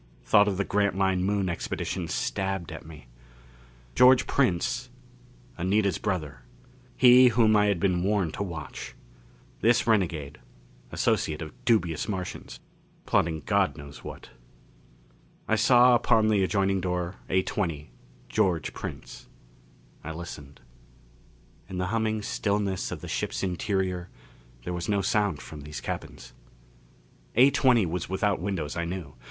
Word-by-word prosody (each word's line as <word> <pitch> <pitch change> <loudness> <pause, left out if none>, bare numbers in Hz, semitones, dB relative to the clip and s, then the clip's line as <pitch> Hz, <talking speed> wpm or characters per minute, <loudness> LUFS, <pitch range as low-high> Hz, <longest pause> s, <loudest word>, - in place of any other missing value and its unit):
Thought 105 0 +5
of 100 -2 -1
the 100 - +1
Grantline 95 -2 +1
Moon 100 0 0
Expedition 85 -2 -3
stabbed 95 -3 -2
at - - -8
me. 75 -5 -12 0.9
George 125 - +6
Prince 125 +2 0 0.7
Anita's 100 +2 +1
brother 90 -9 -3 0.6
he 125 0 +8
whom 110 -2 +4
I 105 0 +4
had 100 -4 +1
been 90 -2 +1
warned 95 -4 0
to - - -5
watch. 85 -7 -6 0.6
This 120 +1 +3
renegade 85 -10 0 0.5
associate 75 -1 0
of 75 - -9
dubious 90 -9 +1
Martians, 90 - -5 0.5
plotting 80 -2 +1
God - - +1
knows 70 0 -11
what. - - -9 1.2
I - - +2
saw, 125 0 +6
upon 115 -2 +3
the 105 -2 +3
adjoining 95 0 +1
door, 90 0 -2
A20, 90 -5 -1 0.4
George 85 -5 0
Prince. - - -8 0.8
I 80 - -5
listened. 75 -4 -9 1.1
In 95 - -5
the 90 - -1
humming 110 -1 0
stillness 100 -3 -1
of - - -6
the - - -8
ship's - - -3
interior 95 -1 -2 0.5
there 90 - -4
was 90 +1 -4
no 100 -1 +1
sound 100 -9 0
from 75 -2 -10
these 75 +1 -7
cabins. - - -7 1.0
A20 130 -4 +5
was 85 +1 -4
without 95 -1 0
windows, 90 -6 -3
I 85 - -1
knew. 85 -5 -6
95 Hz, 130 wpm, -27 LUFS, 85-105 Hz, 1.2 s, he